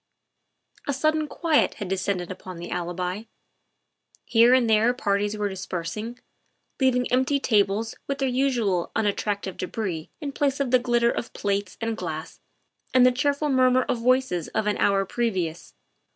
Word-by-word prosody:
A 285 - +1
sudden 310 +3 +1
quiet 320 -1 +1
had 205 - -5
descended 185 -1 -2
upon 185 -1 -8
the 170 +1 -7
Alibi. 180 +4 -3 1.0
Here 235 +1 +5
and 255 -2 +4
there 225 +3 +3
parties 205 -2 0
were 210 -1 0
dispersing, 190 +4 -5 0.6
leaving 255 -2 +3
empty 260 +3 +2
tables 215 -2 +1
with 275 - -2
their 270 - 0
usual 245 -9 0
unattractive 205 -3 -1
debris 185 -4 -4
in 290 -3 -4
place 275 0 0
of 270 -3 -1
the 255 - +6
glitter 240 -1 +2
of 230 - -4
plate 200 -1 -2
and 225 -1 -2
glass 160 -5 -6 0.6
and 255 -1 +7
the 255 - +6
cheerful 285 +3 0
murmur 255 -1 +4
of 245 - -2
voices 250 -8 +1
of 220 - -2
an 210 - 0
hour 195 -1 +2
previous. 190 -8 -2
225 Hz, 150 wpm, -25 LUFS, 190-255 Hz, 1.0 s, and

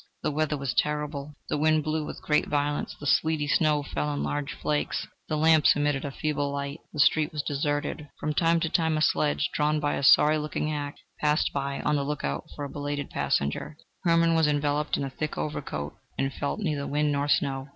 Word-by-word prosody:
The - - +1
weather 150 0 0
was 135 -2 -2
terrible; 150 -1 -1
the - - -1
wind 155 0 +3
blew 155 +1 -1
with - - -8
great 150 - +2
violence; 145 0 -1
the 145 - -8
sleety 155 0 +2
snow 150 0 +2
fell 150 +1 -2
in - - -2
large 145 -1 -2
flakes; 150 -1 -1 0.2
the 155 - 0
lamps 160 -1 +5
emitted 145 -1 0
a - - -2
feeble 145 0 -2
light, 140 +2 -4
the - - -9
streets 155 +2 +4
were - - -3
deserted; 145 0 -2
from 150 - -1
time 165 +2 +3
to 165 - 0
time 160 -2 +1
a - - 0
sledge, 150 -1 +1
drawn 150 +1 +1
by 145 -1 0
a - - -2
sorry 150 +2 +6
looking 150 0 -2
hack, 145 -1 -3 0.2
passed 150 +1 +2
by, 140 0 -2
on 150 0 +1
the 140 - 0
look 150 +1 -3
out 70 +1 -2
for 145 - -4
a - - -6
belated 145 -1 -4
passenger. 70 - -1 0.3
Hermann 165 -1 +4
was 160 -2 +4
enveloped 145 0 +1
in - - -2
a 135 - -3
thick 155 +3 -4
overcoat, 75 - -4 0.2
and 135 0 -1
felt 145 - -3
neither 150 -8 -2
wind 150 +1 +1
nor 140 0 0
snow. 135 -2 +1
150 Hz, 210 wpm, -27 LUFS, 145-155 Hz, 0.3 s, sorry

